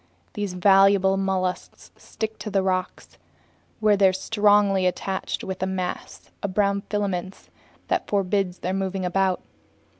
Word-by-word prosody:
These 205 Hz, -4 st, -3 dB
valuable 195 Hz, +1 st, +4 dB
mollusks 190 Hz, -1 st, -3 dB
stick 220 Hz, 0 st, -6 dB
to 215 Hz, -, -5 dB
rocks, 185 Hz, -1 st, -3 dB, 0.6 s
where 215 Hz, -1 st, +4 dB
they're 195 Hz, -1 st, +4 dB
strongly 205 Hz, -1 st, +3 dB
attached 190 Hz, +1 st, -3 dB
by 190 Hz, -, -3 dB
a 190 Hz, -, 0 dB
mass 185 Hz, -1 st, -5 dB
of 190 Hz, -2 st, -4 dB
brown 200 Hz, -1 st, +2 dB
filaments 195 Hz, -3 st, -3 dB, 0.4 s
that -, -, -1 dB
forbids 195 Hz, -2 st, 0 dB
their 185 Hz, -, -3 dB
moving 190 Hz, -1 st, -2 dB
about. 190 Hz, +1 st, 0 dB
195 Hz, 125 wpm, -24 LUFS, 185-200 Hz, 0.6 s, valuable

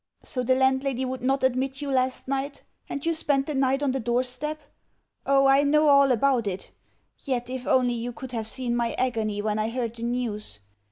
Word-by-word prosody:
So 255 Hz, -, -2 dB
the 255 Hz, +1 st, +2 dB
landlady 265 Hz, 0 st, +1 dB
would 255 Hz, 0 st, -4 dB
not 270 Hz, +2 st, 0 dB
admit 260 Hz, +1 st, 0 dB
you 285 Hz, -1 st, -3 dB
last 260 Hz, -1 st, 0 dB
night, 275 Hz, +1 st, -3 dB, 0.3 s
and 280 Hz, -, -4 dB
you 335 Hz, -, +2 dB
spent 285 Hz, -4 st, +1 dB
the 300 Hz, -, -3 dB
night 270 Hz, +1 st, +1 dB
on 275 Hz, -, +2 dB
the 265 Hz, -, -1 dB
doorstep? 255 Hz, +5 st, -1 dB, 0.7 s
Oh, 275 Hz, 0 st, +4 dB
I 270 Hz, +1 st, +6 dB
know 300 Hz, +1 st, +4 dB
all 280 Hz, -1 st, +6 dB
about 250 Hz, -2 st, +2 dB
it. 190 Hz, -1 st, -5 dB, 0.5 s
Yet 250 Hz, -3 st, -3 dB
if 255 Hz, -1 st, -5 dB
only 250 Hz, -1 st, +3 dB
you 240 Hz, +1 st, -3 dB
could 260 Hz, 0 st, -9 dB
have 225 Hz, -3 st, -3 dB
seen 240 Hz, 0 st, -2 dB
my 235 Hz, -1 st, 0 dB
agony 220 Hz, -5 st, -1 dB
when 215 Hz, 0 st, -1 dB
I 215 Hz, +1 st, 0 dB
heard 235 Hz, -1 st, -3 dB
the 230 Hz, -, -11 dB
news!... 230 Hz, -, -3 dB
260 Hz, 205 wpm, -26 LUFS, 240-275 Hz, 0.7 s, I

